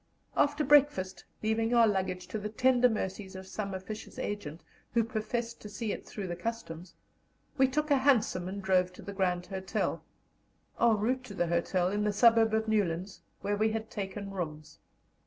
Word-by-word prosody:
After 290 +1 +2
breakfast, 265 -11 +3 0.2
leaving 225 +2 +1
our 230 -1 +7
luggage 190 -3 -1
to 215 - -3
the 210 +1 -4
tender 250 +2 +4
mercies 195 -3 -4
of 190 0 -7
some 195 0 -4
officious 190 +3 -7
agent, 170 -6 -4 0.3
who 230 - +5
professed 230 +1 -3
to 210 - -8
see 215 +1 -3
it - - -6
"through 205 - -5
the 175 -1 -3
Customs," 180 -4 -6 0.6
we 265 -2 +5
took 300 +3 -1
a 285 - +6
hansom 255 -9 +2
and 195 +1 -5
drove 185 -1 +3
to - - -12
the 200 - -6
Grand 180 -2 0
Hotel, 190 +1 -2 0.8
en 230 -2 +5
route 250 +5 0
to 205 - -9
the 175 - +1
hotel, 175 +2 +1
in 205 +2 0
the 210 0 +1
suburb 225 0 +5
of 220 0 0
Newlands, 190 -4 0 0.2
where 205 +1 0
we 215 +2 +2
had 220 0 -4
taken 200 0 -5
rooms. 155 -5 -6
205 Hz, 180 wpm, -30 LUFS, 185-230 Hz, 0.8 s, our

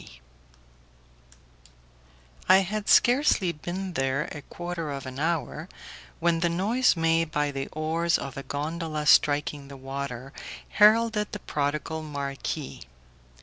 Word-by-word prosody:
I 190 +1 +8
had 210 +2 -3
scarcely 240 - +4
been 180 +4 -5
there 135 0 0
a 150 - -7
quarter 175 +1 -5
of 140 -1 -5
an 130 +1 -7
hour 165 +1 -2 0.5
when 170 0 +2
the 170 +1 +1
noise 210 +9 +2
made 165 0 +2
by 150 -1 0
the 135 -1 -4
oars 165 +2 0
of 135 -2 -6
a 140 - -5
gondola 155 +2 -3
striking 145 -1 +3
the 140 0 -10
water 135 0 -6 0.4
heralded 215 0 +4
the 210 - -4
prodigal 150 +1 -2
marquis. 140 -1 -5
160 Hz, 120 wpm, -27 LUFS, 140-175 Hz, 0.5 s, I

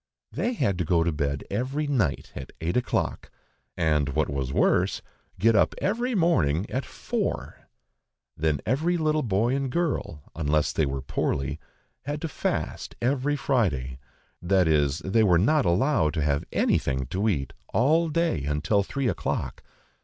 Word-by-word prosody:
They 245 - -1
had 100 - 0
to - - +1
go 85 +1 +2
to 85 - +1
bed 70 -2 -2
every 130 +8 -1
night 120 - 0
at 65 - -7
eight 85 +2 -2
o'clock, 125 - -1 0.5
and 75 -4 +2
what 75 +3 0
was 70 -2 -2
worse, - - +2 0.3
get 115 +4 +4
up 100 - +3
every 240 +5 0
morning 95 - +2
at 130 - -2
four. - - -4 0.7
Then 75 -2 0
every 155 - +1
little 155 -1 +1
boy 115 +2 +1
and 135 -2 -2
girl, 145 - -2
unless 75 -1 +1
they 80 - +1
were 70 -1 -3
poorly, 70 +2 -2 0.5
had 145 +1 -3
to 165 - -2
fast 150 - -3
every 135 +3 +1
Friday, 75 - 0 0.4
that 90 0 +3
is, 75 +1 +2
they 100 +4 +3
were 90 -5 +5
not 135 - +3
allowed 95 - +2
to 75 - 0
have 70 -1 0
anything 65 -1 +1
to 100 +4 +1
eat 70 - -2 0.2
all 160 +7 +3
day 165 - 0
until 75 +8 +1
three 135 +6 -2
o'clock. - - -2
95 Hz, 155 wpm, -26 LUFS, -, 0.7 s, were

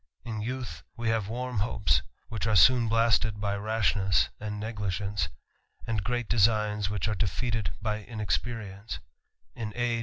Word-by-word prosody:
* - - -49
In 110 -1 -3
youth, 125 +2 -4 0.2
we 115 -1 +1
ha 115 - +3
ve 100 - -5
w 115 +3 -4
arm 125 -4 -2
hopes^ 100 -5 +2 0.3
which 115 -1 -2
are 110 - +2
soon 120 +5 +7
blasted 115 -1 +3
by 100 -1 0
rashness^ 100 -3 +2
an 105 0 -4
d 105 - -3
neglige 100 -4 -2
nce, 100 -4 -1 0.6
agi 110 -3 0
great 120 +2 -1
designs, 105 -2 +3
which 105 -1 -1
are 110 - +1
defeated 105 0 -1
by 105 -1 -1
inexpeofigce. 105 0 -3
105 Hz, 160 wpm, -29 LUFS, 100-115 Hz, 0.6 s, soon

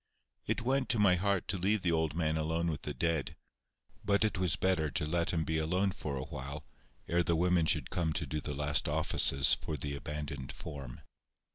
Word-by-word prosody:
It 120 - -1
went 130 +1 +1
to 120 - +2
my 100 -3 +5
heart 100 +1 +1
to 95 -1 -1
leave 100 +3 +1
the 85 - +2
old 80 -2 0
man 80 -2 +1
alone 80 +2 0
with 75 - -5
the - - -4
dead; 85 -4 -1 0.7
but 100 +2 +3
it 105 -3 -1
was 90 -3 +1
better 90 -5 +1
to 75 - -2
let 85 +2 0
him 80 -2 +1
be 80 0 -1
alone 90 +5 +1
for 75 -5 -5
a 65 - -3
while, 70 +4 -7 0.4
ere 85 +1 +2
the 85 0 +1
women 90 -1 +2
should 75 -5 0
come 85 -3 0
to 75 - -2
do 75 +2 -3
the 75 -1 -4
last 75 0 0
offices 70 0 +4
for 80 - -2
the 70 +1 -4
abandoned 75 -2 -5
form. 70 -6 -8
80 Hz, 210 wpm, -32 LUFS, 75-90 Hz, 0.7 s, my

